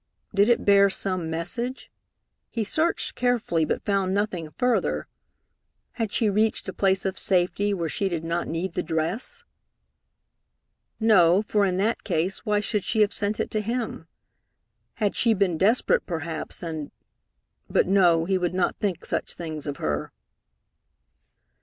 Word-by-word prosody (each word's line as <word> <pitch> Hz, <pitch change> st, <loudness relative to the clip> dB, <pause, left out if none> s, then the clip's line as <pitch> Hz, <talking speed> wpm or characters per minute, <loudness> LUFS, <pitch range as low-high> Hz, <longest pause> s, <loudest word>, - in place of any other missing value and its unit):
Did 200 Hz, +3 st, +4 dB
it 240 Hz, -, +2 dB
bear 200 Hz, 0 st, +6 dB
some 185 Hz, -3 st, -1 dB
message? 235 Hz, +11 st, -4 dB, 0.6 s
He 230 Hz, -, -2 dB
searched 315 Hz, +10 st, 0 dB
carefully, 230 Hz, -10 st, +1 dB
but -, -, -2 dB
found 195 Hz, -2 st, +1 dB
nothing 190 Hz, -6 st, -2 dB
further. 250 Hz, +8 st, 0 dB, 0.8 s
Had 225 Hz, -4 st, -3 dB
she 225 Hz, -, +1 dB
reached 215 Hz, +2 st, +1 dB
a -, -, -4 dB
place 195 Hz, -1 st, +1 dB
of 190 Hz, -1 st, -2 dB
safety 190 Hz, +2 st, +1 dB
where 170 Hz, -4 st, -1 dB
she 195 Hz, +5 st, -1 dB
did 165 Hz, -3 st, -3 dB
not 170 Hz, +1 st, -2 dB
need 170 Hz, +3 st, -3 dB
the -, -, -1 dB
dress? 175 Hz, -, -3 dB, 1.6 s
No, 195 Hz, -4 st, +5 dB
for 210 Hz, -1 st, +2 dB
in 185 Hz, -1 st, 0 dB
that 215 Hz, +4 st, 0 dB
case, 180 Hz, +1 st, -1 dB
why 210 Hz, -1 st, +1 dB
should 210 Hz, -1 st, 0 dB
she 220 Hz, -, +1 dB
have 210 Hz, -, +3 dB
sent 210 Hz, +1 st, -1 dB
it -, -, -2 dB
to 215 Hz, -, 0 dB
him? 230 Hz, +2 st, -3 dB, 0.9 s
Had 210 Hz, -3 st, 0 dB
she 230 Hz, -2 st, +3 dB
been 190 Hz, -4 st, +1 dB
desperate 210 Hz, +9 st, +2 dB
perhaps, 165 Hz, -2 st, -4 dB
and? 160 Hz, -3 st, -4 dB, 0.8 s
But -, -, +3 dB
no, 175 Hz, -4 st, +4 dB
he 190 Hz, +1 st, +1 dB
would 180 Hz, 0 st, -1 dB
not 185 Hz, -, 0 dB
think 190 Hz, -5 st, -2 dB
such -, -, -3 dB
things 155 Hz, -3 st, -6 dB
of 145 Hz, -, -3 dB
her. 75 Hz, -1 st, -2 dB
195 Hz, 155 wpm, -25 LUFS, 170-215 Hz, 1.6 s, bear